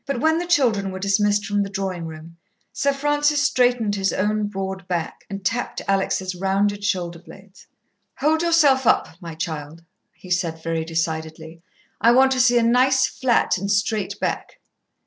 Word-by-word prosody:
But 275 -3 -2
when 320 +4 +2
the 350 - -4
children 235 - +2
were 190 - -6
dismissed 205 +1 +1
from 205 -1 0
the 200 - -2
drawing 190 -4 -4
room, 160 +1 -11 0.4
Sir 280 - +1
Francis 290 +1 +1
straightened 245 -5 +2
his 195 -1 0
own 210 +1 0
broad 190 -2 -5
back, 170 -3 -3
and 195 -1 -7
tapped 245 +5 -2
Alex' 195 -1 0
rounded 200 +2 0
shoulder 175 -4 -2
blades. 190 +2 -16 0.5
"Hold 315 +3 +1
yourself 295 -7 +3
up, - - +3
my 165 -2 -8
child," 160 0 -6 0.3
he 185 - -13
said 165 -3 -1
very 165 -1 -2
decidedly. 160 0 -4 0.4
"I 235 +1 +5
want 265 +1 +5
to 260 - 0
see 245 -1 +4
a 235 - +3
nice 255 +3 +3
flat, 240 -6 +1
and 200 +2 -4
straight 205 0 -1
back." - - -3
200 Hz, 165 wpm, -22 LUFS, 175-245 Hz, 0.5 s, I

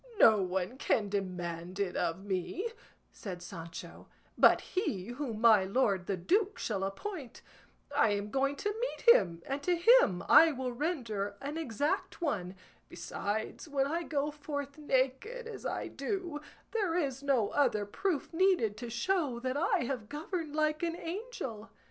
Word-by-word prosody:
"No 220 - +7
one 185 +7 -2
can 210 -7 +1
demand 180 -2 -4
it 195 -3 -1
of 185 +4 -1
me," 205 - -2 0.4
said 180 -4 -7
Sancho, 170 -3 -9 0.3
"but - - +6
he 215 - -3
whom 240 -3 -4
my 220 -4 +7
lord 195 -3 +1
the 195 - -1
duke 390 - +1
shall 200 -4 -2
appoint; 260 - -5 0.5
I 225 - +5
am 205 +1 -3
going 275 +2 +1
to 415 +8 -2
meet - - +5
him, 170 -2 0
and 275 +1 -3
to 355 +4 +2
him 345 - +5
I 325 -1 +8
will 255 -1 -3
render 235 - -2
an 285 +2 -5
exact 295 -2 -1
one; 200 - -2 0.3
besides, 220 +9 -4
when 280 -2 +1
I 325 +5 -1
go 295 -3 -1
forth 285 -1 -5
naked 280 - 0
as 460 -2 -6
I - - -3
do, 355 -7 -3 0.3
there 395 -7 0
is 275 -6 -1
no 265 -7 +2
other 215 -8 +2
proof 335 - -2
needed 335 - +3
to 240 +2 -6
show 265 +1 0
that 255 +1 -2
I 290 -4 +2
have 235 -4 -4
governed 310 0 -4
like 305 0 +1
an 335 -1 -1
angel." 335 - -6
265 Hz, 155 wpm, -32 LUFS, 205-330 Hz, 0.5 s, I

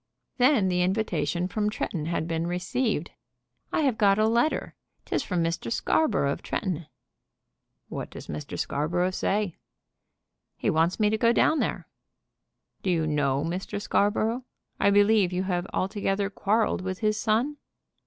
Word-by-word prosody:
Then 250 -6 +4
the 180 -1 +1
invitation 180 -3 0
from 210 +2 0
Tretton 165 -6 -3
had 165 -1 -1
been 165 0 -1
received. 180 - -1 0.6
"I - - +1
have 265 -7 +1
got 200 -1 +5
a 215 - +3
letter; 235 +7 +1 0.3
'tis - - -1
from 180 -3 -1
Mr. 165 -8 -2
Scarborough 205 - +2
of - - -4
Tretton." 170 -5 -3 1.0
"What - - -5
does - - -9
Mr. 75 0 -6
Scarborough 175 +5 0
say?" 195 -1 -1 1.0
"He - - +1
wants 165 +5 +1
me 210 -1 +3
to 220 - 0
go 230 +1 +4
down 310 +5 +3
there." - - -2 0.9
"Do 190 - -1
you 165 -3 +2
know 145 -2 +1
Mr. 180 +4 -3
Scarborough? 220 +4 +1 0.4
I - - +4
believe 205 -1 +4
you 180 +1 -1
have 180 -1 -1
altogether 195 0 -1
quarrelled 215 0 +1
with 185 0 -4
his 215 0 +1
son?" 235 +7 +1
190 Hz, 150 wpm, -27 LUFS, 170-215 Hz, 1.0 s, got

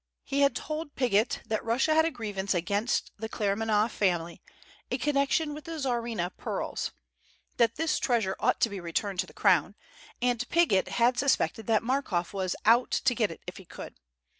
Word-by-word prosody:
He 280 - -2
had 280 0 +4
told 310 -1 -5
Piggott 235 -3 +1
that 220 - -2
Russia 250 +7 +2
had 320 0 +4
a - - +2
grievance 205 - -3
against 200 +7 0
the 220 +1 -4
Claremanagh 215 +1 +1
family 175 -5 -1 0.5
in - - -1
connection 295 +1 +1
with 300 +1 -9
the 330 - -6
Tsarina 235 - -1
pearls; - - -3 0.7
that 230 -1 +3
this 325 -1 0
treasure 225 -7 +1
ought 250 - +2
to 230 - +4
be 200 - -5
returned 180 +3 -3
to - - 0
the - - -13
Crown; - - +3 0.4
and 245 -1 0
Piggott 330 - +3
had 240 +1 +2
suspected 255 -5 +1
that 225 -1 +3
Markoff 230 -9 -1
was 190 -2 -1
"out" 235 +3 +5
to 250 - +2
get 225 -3 +1
it 165 - -10
if - - -7
he - - -12
could. - - -9
230 Hz, 180 wpm, -28 LUFS, 200-270 Hz, 0.7 s, out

